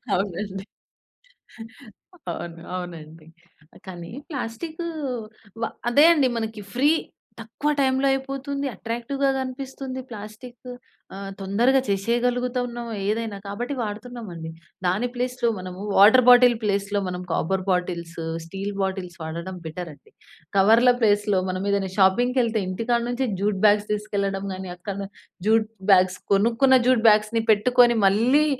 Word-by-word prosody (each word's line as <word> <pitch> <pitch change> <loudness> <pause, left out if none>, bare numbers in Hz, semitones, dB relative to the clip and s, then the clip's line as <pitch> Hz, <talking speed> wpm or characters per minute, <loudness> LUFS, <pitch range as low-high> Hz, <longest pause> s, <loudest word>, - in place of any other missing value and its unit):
అవునండి. 195 +1 -3 1.7
అవును. 170 -1 -7
అవునండి. 165 -3 -8 0.6
కానీ, 175 -1 -8 0.2
ప్లాస్టిక్ 305 +5 -5 0.8
వా - - 0 0.2
అదే 290 +5 +6
అండి 275 -5 +2
మనకి 220 -1 -4
ఫ్రీ, 280 +5 +3 0.5
తక్కువ 235 +7 -3
టైమ్‌లో 265 0 +2
అయిపోతుంది. 275 +1 -3
అట్రాక్టివ్‌గా 240 +6 -2
గనిపిస్తుంది 260 0 -5
ప్లాస్టిక్. 220 +3 -10 0.5
ఆహ్, 195 0 -6
తొందరగా 235 +8 +3
చేసేయగలుగుతున్నాం 240 +3 -1 0.2
ఏదైనా. 215 -1 -2
కాబట్టి 240 +7 -4
వాడుతున్నాం 225 +2 -6
అండి. 160 -1 -7 0.4
దాని 195 +8 +1
ప్లేస్‌లో 250 -1 -1
మనము 185 0 -8 0.2
వాటర్ 220 +6 +7
బాటిల్ 245 -1 +7
ప్లేస్‌లో 200 0 0
మనం 180 0 -4
కాపర్ 185 +4 0
బాటిల్స్, 170 -2 -2 0.3
స్టీల్ 195 +4 -5
బాటిల్స్ 190 -2 -3
వాడడం 170 +4 -5
బెటర్ 170 +2 -6
అండి. 140 - -23 0.5
కవర్ల 225 +6 +6
ప్లేస్‌లో 205 -2 +3
మనం 185 +2 -3
ఏదైనా 195 -1 0
షాపింగ్‌కెళ్తే 230 +3 +3
ఇంటికాడ 230 +6 0
నుంచి 250 +1 -1
జ్యూట్ 200 -1 0
బ్యాగ్స్ 210 0 +4
తీసుకెళ్లడం 200 -2 -2
కానీ, 185 0 -7
అక్కడ‌నే 195 +2 -6 0.4
జ్యూట్ 220 0 +3 0.2
బ్యాగ్స్ 185 0 +3 0.2
కొనుక్కున్న 235 +6 +4
జ్యూట్ 255 -3 +3
బ్యాగ్స్‌ని 215 +2 +2
పెట్టుకొని 240 +2 +4
మళ్ళీ 250 +10 +3
215 Hz, 120 wpm, -24 LUFS, 190-245 Hz, 1.7 s, వాటర్